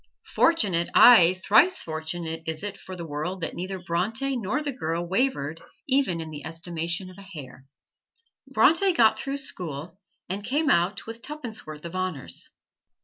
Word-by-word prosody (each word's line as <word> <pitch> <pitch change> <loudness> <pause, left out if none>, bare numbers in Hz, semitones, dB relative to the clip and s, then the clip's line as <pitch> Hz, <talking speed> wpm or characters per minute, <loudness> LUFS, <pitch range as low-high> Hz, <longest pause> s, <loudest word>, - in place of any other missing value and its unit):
Fortunate, 200 - +3
aye, 185 -7 +8
thrice 350 - +5
fortunate 160 +1 -4
is 160 +1 -4
it 205 -1 -4
for 185 - -9
the 170 -2 -6
world 160 +5 -4
that 165 - -2
neither 185 +2 -4
Bronte 200 +10 -1
nor 245 +6 -2
the 290 - -2
girl 170 -8 -3
wavered 170 - 0 0.3
even 260 -11 +1
in 160 -1 -6
the 145 -2 -8
estimation 170 +2 -4
of 185 - -15
a - - -10
hair. 145 -8 -11 0.8
Bronte 375 +3 +4
got 225 -9 +4
through 275 +1 -3
school 175 - -5 0.3
and 195 +3 -4
came 285 +7 +1
out 175 +3 +1
with 230 +1 -8
tuppence 255 - -7
worth 155 +1 -9
of 170 - -6
honors. 185 -8 -3
185 Hz, 160 wpm, -26 LUFS, 165-235 Hz, 0.8 s, aye